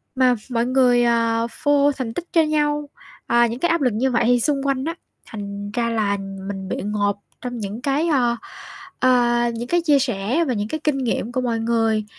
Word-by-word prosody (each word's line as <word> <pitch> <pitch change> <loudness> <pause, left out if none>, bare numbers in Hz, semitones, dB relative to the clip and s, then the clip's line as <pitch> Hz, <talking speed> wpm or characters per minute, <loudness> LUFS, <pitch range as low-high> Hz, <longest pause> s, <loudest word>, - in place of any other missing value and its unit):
mà 255 -1 +4 0.2
mọi 235 -1 +1
người, 250 -1 +3
ờ, 230 -1 +2
phô 290 -1 +2
thành 255 -5 -5
tích 345 - -5
cho 330 - +5
nhau, 295 -1 0 0.4
ờ, 240 0 +4
những 235 +1 -3
cái 345 - +1
áp 335 -1 +1
lực 250 -4 +2
như 255 +5 0
vậy 235 - +2
thì 245 0 +4
xung 275 +2 0
quanh 270 -1 0
á, 330 +1 -3 0.3
thành 205 -1 -7
ra 235 +1 -1
là 210 -3 0 0.3
mình 195 -1 -5
bị - - -1
ngộp 205 -1 0 0.2
trong 245 -1 -5
những 210 +1 -5
cái, 285 +5 0
ơ, 245 -7 +2 0.6
ờ, 240 -2 +3
những 235 +1 -5
cái 345 +5 +2
chia 295 -4 +4
sẻ 250 +5 0
và 255 - 0
những 205 -1 -2
cái 310 +8 -4
kinh 300 -3 +1
nghiệm 245 -2 -2
của 255 - -1
mọi 235 -2 -1
người. 225 -2 +1
245 Hz, 210 wpm, -21 LUFS, 225-275 Hz, 0.6 s, cho